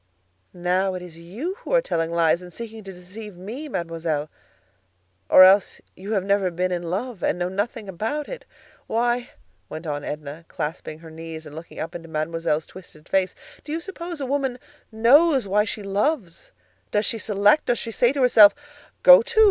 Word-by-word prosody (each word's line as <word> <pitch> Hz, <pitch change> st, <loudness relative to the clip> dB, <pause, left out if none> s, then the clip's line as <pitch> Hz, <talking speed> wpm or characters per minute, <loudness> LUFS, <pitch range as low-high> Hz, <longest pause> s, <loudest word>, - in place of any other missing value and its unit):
"Now 185 Hz, +2 st, 0 dB
it 180 Hz, -, -6 dB
is 165 Hz, -2 st, -11 dB
you 235 Hz, -, -5 dB
who -, -, -9 dB
are -, -, +6 dB
telling 165 Hz, -, -1 dB
lies 170 Hz, 0 st, +2 dB
and 180 Hz, 0 st, -11 dB
seeking 225 Hz, +1 st, -8 dB
to 195 Hz, -, -7 dB
deceive 190 Hz, +3 st, -10 dB
me, 235 Hz, +12 st, -7 dB
Mademoiselle; 165 Hz, -, -3 dB, 1.0 s
or 185 Hz, -, +9 dB
else 190 Hz, +1 st, +5 dB, 0.2 s
you 200 Hz, +4 st, -5 dB
have 195 Hz, -3 st, +1 dB
never 200 Hz, -1 st, +1 dB
been 180 Hz, +1 st, -2 dB
in 175 Hz, -1 st, -1 dB
love, 195 Hz, +6 st, -4 dB
and -, -, 0 dB
know 175 Hz, 0 st, -1 dB
nothing 205 Hz, +2 st, -3 dB
about 225 Hz, -, -3 dB
it. -, -, -7 dB, 0.4 s
Why," 240 Hz, +2 st, 0 dB, 0.4 s
went 160 Hz, +2 st, -7 dB
on 145 Hz, -2 st, -3 dB
Edna, 150 Hz, +2 st, -7 dB
clasping 155 Hz, 0 st, -5 dB
her 160 Hz, 0 st, -13 dB
knees 160 Hz, 0 st, -8 dB
and 150 Hz, 0 st, -11 dB
looking 160 Hz, +1 st, -10 dB
up 165 Hz, +2 st, -5 dB
into 165 Hz, -1 st, -9 dB
Mademoiselle's 160 Hz, 0 st, -1 dB
twisted 165 Hz, -4 st, -15 dB
face, 190 Hz, -1 st, 0 dB, 0.3 s
"do 295 Hz, -, -8 dB
you 320 Hz, -, -1 dB
suppose 345 Hz, -2 st, -7 dB
a 275 Hz, -, -3 dB
woman 265 Hz, -2 st, -1 dB, 0.3 s
knows 265 Hz, +4 st, +4 dB
why 210 Hz, +2 st, +2 dB
she 210 Hz, -1 st, -5 dB
loves? 200 Hz, -, -2 dB, 0.4 s
Does 210 Hz, +1 st, +1 dB
she 225 Hz, -, -2 dB
select? 210 Hz, +5 st, +3 dB
Does 240 Hz, -, +2 dB
she 230 Hz, -, -5 dB
say 240 Hz, +2 st, +3 dB
to 280 Hz, -1 st, -2 dB
herself: 215 Hz, -5 st, +7 dB, 0.5 s
'Go -, -, +10 dB
to! 470 Hz, -1 st, -1 dB
195 Hz, 185 wpm, -23 LUFS, 170-240 Hz, 1.0 s, Go